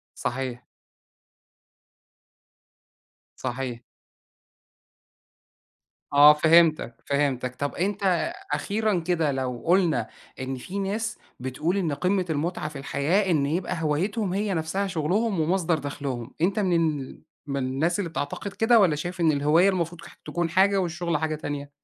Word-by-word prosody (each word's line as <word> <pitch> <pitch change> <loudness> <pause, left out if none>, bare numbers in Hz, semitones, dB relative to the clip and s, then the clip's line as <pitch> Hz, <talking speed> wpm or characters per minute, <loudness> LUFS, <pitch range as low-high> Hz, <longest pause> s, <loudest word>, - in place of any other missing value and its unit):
صحيح. 125 -1 -3 2.7
صحيح. 125 -1 -4 2.3
آه، 145 +1 +9
فهمتَك، 155 -5 +4
فهمتَك، 135 -3 0
طَب 145 0 -3
أنت 195 - 0 0.2
أخيرًا 210 -3 0
كده 165 -3 0
لو 130 -2 -3
قُلنا 170 - +2 0.3
إن 130 0 -3
في 180 +10 -6
ناس 210 +3 -2 0.2
بتقول 140 +8 -1
إن 175 -6 0
قمّة 185 +6 +1
المُتعَة 155 +1 -2
في 150 -2 -9
الحياة، 160 +8 0
إن 145 -4 +2
يبقى 170 +3 -2
هوايتهم 185 +7 0
هي 200 +1 -1
نفْسها 170 +5 -1
شُغلهم 185 +4 0
ومصدر 170 0 +1
دخلُهم، 140 -4 -5
أنت 195 +5 +1
من 185 -4 +2 0.2
ال 130 - -10 0.2
من 140 -1 -3
الناس 140 +7 0
اللي 185 -5 -2
بتعتقد 160 +6 -4
كده، 230 +2 +4
والّا 170 -6 +3
شايف 175 +4 -5
إن 160 -2 +4
الهواية 150 +6 +4
المفروض 175 -3 -1 0.2
تكون 170 -1 -2
حاجة، 195 +2 +4
والشُّغل 170 -1 -1
حاجة 155 +1 -1
تانية؟ 145 -1 -5
165 Hz, 125 wpm, -25 LUFS, 140-185 Hz, 2.7 s, آه